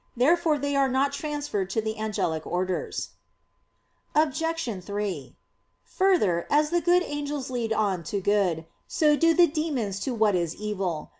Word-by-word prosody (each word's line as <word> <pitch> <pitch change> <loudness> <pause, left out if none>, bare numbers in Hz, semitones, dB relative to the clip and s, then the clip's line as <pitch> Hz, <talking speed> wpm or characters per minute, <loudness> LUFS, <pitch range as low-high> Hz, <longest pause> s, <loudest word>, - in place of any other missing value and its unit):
Therefore 315 +4 +3
they 285 0 -2
are 275 -1 +3
not 270 +2 +1
transferred 290 -10 -3
to 210 - -1
the 220 0 -3
angelic 175 -7 -2
orders. 185 0 -2 1.1
Obj. 310 - 0
3: 200 -8 -4 0.5
Further, 335 - +1
as 300 +1 +3
the 345 0 +2
good 355 +1 +4
angels 290 -3 -4
lead 235 -3 -2
on 205 -5 +1
to 200 +6 -2
good, 190 -5 +1 0.2
so 300 -3 +3
do 330 +2 +3
the 350 - +7
demons 285 - -2
to 250 +4 -3
what 215 -2 +3
is 170 -3 -1
evil. 195 -6 -3
240 Hz, 150 wpm, -26 LUFS, 195-300 Hz, 1.1 s, the